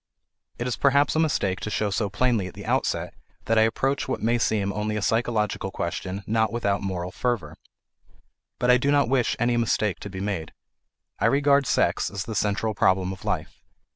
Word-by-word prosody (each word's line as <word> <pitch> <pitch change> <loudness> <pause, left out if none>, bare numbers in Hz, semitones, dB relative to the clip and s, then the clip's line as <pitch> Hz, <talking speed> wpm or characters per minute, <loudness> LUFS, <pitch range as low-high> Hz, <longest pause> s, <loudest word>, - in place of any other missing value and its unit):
It 120 - -3
is 125 - -2
perhaps 140 +2 +3
a - - +2
mistake 115 -12 +1
to - - -4
show 105 -1 -1
so 100 +1 0
plainly 110 -2 +1
at - - -11
the - - -9
outset - - -1 0.3
that 115 0 +3
I 110 0 +5
approach 135 +4 -1
what 130 - -2
may 120 +2 +1
seem 100 -3 0
only 105 +1 -2
a 105 - -2
psychological 110 -3 0
question 95 +2 -4
not 110 0 +1
without 100 -4 0
moral 90 -2 -3
fervour. 100 -9 -2 1.0
But 125 0 +3
I 125 - +6
do 140 +3 0
not 140 -4 +3
wish 130 -3 +2
any 120 0 +1
mistake 105 -5 0
to 100 - -7
be 95 -1 -7
made. 95 -5 -3 0.7
I - - +3
regard 140 +1 +3
sex - - +1
as 100 -1 -4
the 110 - -6
central 105 +1 0
problem 95 -2 +2
of 95 - -12
life. - - -3
110 Hz, 195 wpm, -25 LUFS, 100-120 Hz, 1.0 s, I